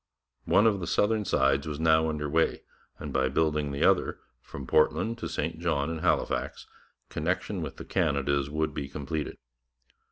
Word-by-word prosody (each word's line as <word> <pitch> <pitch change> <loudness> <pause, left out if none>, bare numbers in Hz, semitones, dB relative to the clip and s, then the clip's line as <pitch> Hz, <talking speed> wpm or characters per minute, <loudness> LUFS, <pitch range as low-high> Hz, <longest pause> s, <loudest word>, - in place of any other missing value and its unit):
One 105 - +4
of 105 -3 +3
the 85 - -4
southern 105 +4 +1
sides 70 -2 +2
was 75 -1 -4
now 80 0 +4
under 75 -1 -2
way, 80 +3 +1 0.3
and - - -7
by 65 0 +2
building 75 0 0
the 70 - -1
other, - - +2 0.2
from 70 - -8
Portland 110 - +2
to - - -4
St - - -3
John 70 +3 0
and 80 -1 -4
Halifax, - - 0 0.4
connection 90 +4 -2
with 75 -4 -6
the - - -8
Canadas 70 -1 0
would 80 0 -1
be 70 -2 -4
completed. 75 +2 -4
75 Hz, 165 wpm, -28 LUFS, 70-80 Hz, 0.4 s, One